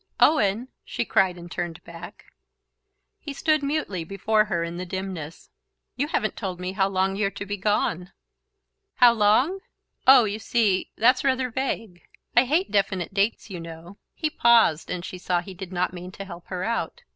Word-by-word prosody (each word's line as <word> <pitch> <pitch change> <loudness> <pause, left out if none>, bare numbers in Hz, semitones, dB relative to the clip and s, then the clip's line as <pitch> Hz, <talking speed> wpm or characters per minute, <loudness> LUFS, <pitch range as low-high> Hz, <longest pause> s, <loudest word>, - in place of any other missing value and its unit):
"Owen!" 230 -4 +3
she 235 - -3
cried, 190 -4 +2
and 175 0 -11
turned 170 -2 -4
back. 170 +1 -11 0.9
He 290 - -7
stood 310 +2 +1
mutely 280 - -2
before 210 +4 +1
her 170 -4 -1
in 170 +1 -5
the 180 - -4
dimness. 180 -4 -6 0.4
"You 280 +3 -1
haven't 215 -8 -1
told 185 -4 -5
me 180 0 -3
how 190 0 +1
long 190 0 0
you're 200 0 +1
to 200 +1 -7
be 205 +1 -3
gone." 190 -3 -1 0.8
"How 245 -2 +7
long? 235 - +3 0.5
Oh, 260 -2 +9
you 210 0 -2
see... 220 -4 +1
that's 250 +3 +4
rather 260 -2 +1
vague...I 230 -1 -2
hate 320 +9 +1
definite 195 -2 0
dates, 205 +2 0
you 180 - -5
know..." 165 +3 -10 0.2
He 310 -2 -2
paused 230 - +4
and 180 0 -4
she 185 - -7
saw 180 -1 0
he 185 +2 -8
did 185 0 -8
not 180 0 -1
mean 180 0 -8
to 195 - -7
help 175 -2 -10
her 180 -1 -4
out. 230 - -3
195 Hz, 175 wpm, -25 LUFS, 180-235 Hz, 0.9 s, Oh